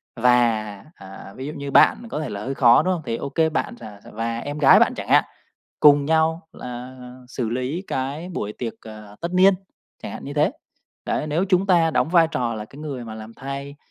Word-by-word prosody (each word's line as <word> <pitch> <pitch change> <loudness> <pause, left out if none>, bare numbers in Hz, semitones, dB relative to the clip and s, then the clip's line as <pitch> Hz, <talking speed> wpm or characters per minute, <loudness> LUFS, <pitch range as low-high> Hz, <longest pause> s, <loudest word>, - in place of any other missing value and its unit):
Và, 115 -4 +1
à, 95 0 -12
ví 135 +2 -6
dụ 150 - -5
như 140 -2 -6
bạn 235 +10 +4
có 150 - -3
thể 155 - -4
là 100 +1 -5
hơi 135 +3 -4
khó, 120 -3 +5
đúng 185 - +1
không? 175 - -4
Thì 115 - -2
ô - - -5
kê 160 +3 +1
bạn 160 - -3
rà 105 -3 -11
r - - -16
và 115 +1 -3
em 145 +4 -5
gái 140 - +7
bạn - - +3
chẳng - - -6
hạn, - - +6 0.6
cùng 145 -1 +6
nhau 160 +2 +1
là 125 +1 -8 0.3
xử 125 -3 -3
lý 130 +8 -3
cái 140 +6 -3
buổi 105 - -4
tiệc, 115 -3 -4
à, 105 -2 -12
tất 170 - -2
niên, 190 +2 +6 0.5
chẳng - - -6
hạn - - -8
như 140 - -6
thế. 150 +3 +3 0.6
Đấy, - - -1
nếu 155 +5 0
chúng 185 0 +2
ta 170 -4 +4
đóng 155 - +1
vai 170 -3 +5
trò 120 -2 -1
là 105 -1 -5
cái 135 +6 -15
người 140 -5 -5
mà 110 -1 -8
làm 110 +1 -10
thay 140 +2 -7
135 Hz, 230 wpm, -22 LUFS, 115-160 Hz, 0.6 s, gái